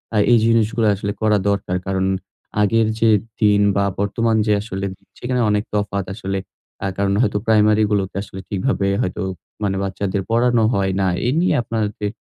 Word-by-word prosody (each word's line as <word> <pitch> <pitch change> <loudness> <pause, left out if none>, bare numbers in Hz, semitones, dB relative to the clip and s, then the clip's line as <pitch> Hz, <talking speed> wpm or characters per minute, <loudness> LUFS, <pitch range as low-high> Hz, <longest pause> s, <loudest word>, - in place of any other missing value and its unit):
আ - - +2
এই 120 - +6
জিনিসগুলো 115 0 +2
আসলে 100 +1 -3
করা 110 -1 +3
দরকার। 100 -2 -1
কারণ 95 -1 0 0.6
আগের 110 +2 +3
যে 115 - +4 0.3
দিন 105 -1 +4
বা 100 0 +2
বর্তমান 110 +3 +1
যে 105 - +4
আসলে 100 -2 -4 0.3
সেখানে 125 0 -1
অনেক 105 0 +1
তফাৎ 100 -2 -1
আসলে। 95 -1 -3 0.5
আ - - +1
কারণ 100 0 +1
হয়তো 105 -4 +1
প্রাইমারি 110 -1 +4
গুলোতে 100 -2 0
আসলে 95 -2 -9
ঠিকভাবে 100 0 -1
হয়তো 90 - -2 0.4
মানে 100 -1 0
বাচ্চাদের 95 0 -2
পড়ানো 120 0 +3
হয় 95 -1 0
না। 95 - +2 0.2
এই 125 - +2
নিয়ে 180 - +2
আপনাদের 105 -2 -2
105 Hz, 165 wpm, -20 LUFS, 100-115 Hz, 0.6 s, এই